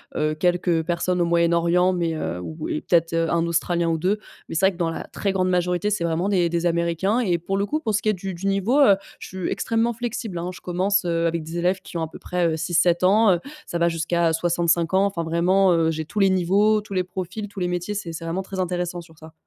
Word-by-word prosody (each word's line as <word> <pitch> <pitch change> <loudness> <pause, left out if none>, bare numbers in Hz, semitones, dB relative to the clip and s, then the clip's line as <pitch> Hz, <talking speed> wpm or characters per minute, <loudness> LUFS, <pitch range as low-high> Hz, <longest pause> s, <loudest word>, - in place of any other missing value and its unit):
heu - - -3
heu, 155 0 +1
quelques 175 0 +1
personnes 175 +2 -1
au 175 - +3
Moyen-Orient, 170 +1 +3
mais 170 -3 -1
heu, 90 - -3
ou 155 - -6
et - - -1
peut-être 165 -1 +1
1 165 0 +1
Australien 170 0 0
ou 165 - +1
2. 185 +6 0 0.3
Mais - - -6
c'est 190 +4 +4
vrai - - +2
que, 175 - -14
dans 170 -2 0
la 165 - -5
très 195 -1 -2
grande 185 -1 +1
majorité, 180 +2 +1
c'est 195 -5 -1
vraiment 170 +4 0
des 180 -4 +2
des 170 +1 -1
Américains 170 +6 0
et 185 -8 +1
pour 195 +4 -3
le 200 - +1
coup, 305 +7 -2
pour 220 -7 -1
ce 210 - +1
qui - - -4
est 215 - +4
du 190 0 -5
du 180 +3 -4
niveau, 195 +8 +2
heu, 205 -9 +7 0.2
je - - -8
suis 185 -1 -4
extrêmement 230 +1 0
flexible, 230 -4 -4
hein. 175 +2 -3
Je - - -12
commence 190 +3 0
avec 165 -1 0
des 165 +2 -6
élèves 180 +2 0
qui - - -7
ont 165 - -2
à 160 - -2
peu - - -12
près, 180 -1 -1
heu, - - 0
6-7 170 +1 +2
ans, 205 +2 +5
heu, 170 - 0 0.3
ça 170 - -3
va 170 0 +2
jusqu'à 165 0 0
65 170 +1 +1
ans, 195 +1 +4
enfin, 180 -4 -2
vraiment, 180 +3 +3
heu, 165 -1 +2
j'ai 160 -1 -4
tous 210 - -4
les 195 - +5
niveaux, 200 +4 +3
tous 205 -1 -9
les 185 - +1
profils, 185 +3 -6
tous 200 - -9
les 180 - 0
métiers. 180 +3 -3
C'est 175 -5 -5
c'est 165 - -7
vraiment 165 +3 -2
très 190 0 -7
intéressant 175 -1 -2
sur 160 -2 -18
ça. 160 0 -13
175 Hz, 260 wpm, -23 LUFS, 170-195 Hz, 0.3 s, heu